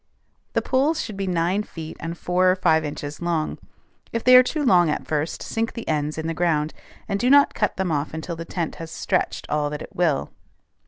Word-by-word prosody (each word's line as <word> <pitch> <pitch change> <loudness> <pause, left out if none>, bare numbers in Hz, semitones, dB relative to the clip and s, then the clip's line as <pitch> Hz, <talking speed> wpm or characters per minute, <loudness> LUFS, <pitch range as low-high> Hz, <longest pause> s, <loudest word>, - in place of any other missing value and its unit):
The - - +1
poles 285 +5 +1
should 215 - -4
be 195 0 -3
nine 180 +3 +1
feet 160 -6 -8
and 165 +1 -5
four 180 +1 +2
or 185 - +4
five 160 -4 +3
inches 145 0 -6
long. 170 -3 -1 0.5
If 230 - -2
they 255 0 +7
are 250 - +11
too 295 +4 -2
long 180 - +5
at 150 - -2
first, 155 +1 -2
sink 225 0 -2
the 230 - -7
ends 150 0 -1
in 160 - -3
the 165 - -1
ground, 160 -2 0 0.3
and 200 -2 -1
do 245 - +2
not 285 +1 +6
cut 210 - -1
them 190 -3 -1
off 145 0 -1
until 160 +2 -5
the 165 - -6
tent 165 -1 -4
has 165 - -6
stretched 165 - -1
all 150 -1 0
that 150 0 -5
it - - -13
will. 165 -6 +1
170 Hz, 220 wpm, -23 LUFS, 155-205 Hz, 0.5 s, are